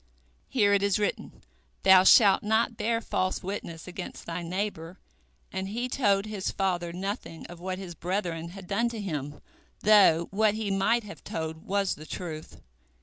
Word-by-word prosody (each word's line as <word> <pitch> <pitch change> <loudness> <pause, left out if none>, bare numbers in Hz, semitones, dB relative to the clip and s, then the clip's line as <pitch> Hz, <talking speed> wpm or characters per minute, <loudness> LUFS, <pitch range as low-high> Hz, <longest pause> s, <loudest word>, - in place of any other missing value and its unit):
Here 205 -6 +3
it 200 - +3
is 200 0 +2
written, 210 -1 -3 0.4
Thou 190 -1 +7
shalt 200 -3 +7
not 220 +2 +1
bear 230 +1 0
false 185 -4 -1
witness 180 -4 -6
against 180 0 -7
thy 170 +1 -4
neighbor, 180 -1 -4 0.6
and 190 0 -3
he 240 +4 -2
told 205 -6 +1
his 210 -3 -3
father 175 -3 -1
nothing 185 -2 -5
of 175 -1 -10
what 185 +1 -4
his 185 -2 -7
brethren 170 -1 -3
had 190 +1 -10
done 220 +6 0
to 230 -2 -6
him, 145 -7 -5 0.4
though 195 -6 +6
what 210 +1 +2
he 215 -2 -2
might 220 +5 +2
have 205 -1 -11
told 160 -5 -5
was 195 0 +1
the 155 +1 -11
truth. 160 -3 -7
195 Hz, 165 wpm, -28 LUFS, 175-210 Hz, 0.6 s, Thou